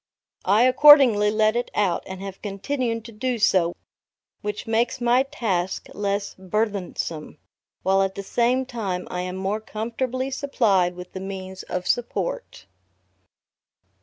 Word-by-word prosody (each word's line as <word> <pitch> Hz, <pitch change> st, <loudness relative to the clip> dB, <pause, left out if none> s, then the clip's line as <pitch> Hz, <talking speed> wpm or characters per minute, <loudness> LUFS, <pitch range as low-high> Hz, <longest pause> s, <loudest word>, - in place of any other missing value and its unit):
I 205 Hz, +5 st, +4 dB
accordingly 255 Hz, -5 st, +7 dB
let 215 Hz, +1 st, +2 dB
it 240 Hz, -, -1 dB
out, 190 Hz, -5 st, +1 dB
and 190 Hz, 0 st, -7 dB
have 195 Hz, -1 st, -8 dB
continued 230 Hz, +3 st, -3 dB
to 235 Hz, -, -9 dB
do 245 Hz, +3 st, -2 dB
so, 185 Hz, -5 st, +2 dB, 0.7 s
which 210 Hz, 0 st, -4 dB
makes 230 Hz, +3 st, 0 dB
my 245 Hz, +1 st, +3 dB
task 215 Hz, -11 st, -2 dB
less 200 Hz, 0 st, -2 dB
burthensome, 190 Hz, -5 st, -3 dB, 0.5 s
while 195 Hz, +1 st, +3 dB
at 195 Hz, 0 st, -1 dB
the 200 Hz, -, -5 dB
same 245 Hz, +5 st, +1 dB
time 200 Hz, -8 st, -4 dB
I 180 Hz, -, -2 dB
am 180 Hz, 0 st, -4 dB
more 195 Hz, +3 st, -2 dB
comfortably 245 Hz, +5 st, -3 dB
supplied 205 Hz, -10 st, +1 dB
with 180 Hz, 0 st, -10 dB
the 190 Hz, -, -5 dB
means 190 Hz, -1 st, -6 dB
of 180 Hz, 0 st, -4 dB
support. -, -, -2 dB
210 Hz, 135 wpm, -24 LUFS, 190-240 Hz, 0.7 s, accordingly